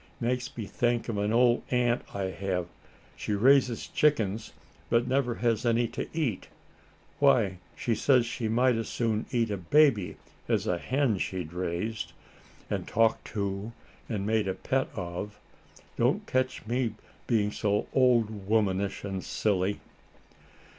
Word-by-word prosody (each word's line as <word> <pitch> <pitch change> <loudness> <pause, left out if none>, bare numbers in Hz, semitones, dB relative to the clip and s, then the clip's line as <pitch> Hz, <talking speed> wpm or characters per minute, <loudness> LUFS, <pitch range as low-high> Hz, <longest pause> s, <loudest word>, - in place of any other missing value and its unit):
Makes 125 +2 -2
me 110 - -3
think 120 +4 0
of 105 -3 -1
an 105 +1 0
old 120 +1 +4
aunt 125 -1 +2
I 95 -2 -2
have. 95 -2 -2 0.5
She 105 - -3
raises 125 +2 +4
chickens, 110 -8 +1 0.4
but 115 0 +3
never 130 -3 +1
has 115 -3 0
any 120 0 +2
to - - -4
eat. 145 - -2 0.7
Why, 115 -10 +3 0.2
she 120 - -1
says 125 +2 +3
she 120 -1 -3
might 125 +3 +3
as 115 - -3
soon 115 -2 -1
eat 115 -4 0
a 100 - -1
baby, 105 - +3 0.3
as - - +1
a 90 - 0
hen 130 -4 +1
she'd 90 -4 -3
raised, 90 +1 -3 0.5
and - - -3
talked 115 0 +2
to, 100 +2 -2 0.4
and 105 -4 -2
made 110 -1 +1
a 95 - -1
pet 135 0 0
of. 90 +3 -5 0.6
Don't - - +2
ketch 130 -3 -1
me 120 -1 -1 0.3
being 105 -3 +2
so 105 -1 0
old 115 -6 +2
womanish 100 -3 +1
and 95 -2 -4
silly." 100 -1 0
110 Hz, 145 wpm, -28 LUFS, 100-125 Hz, 0.7 s, old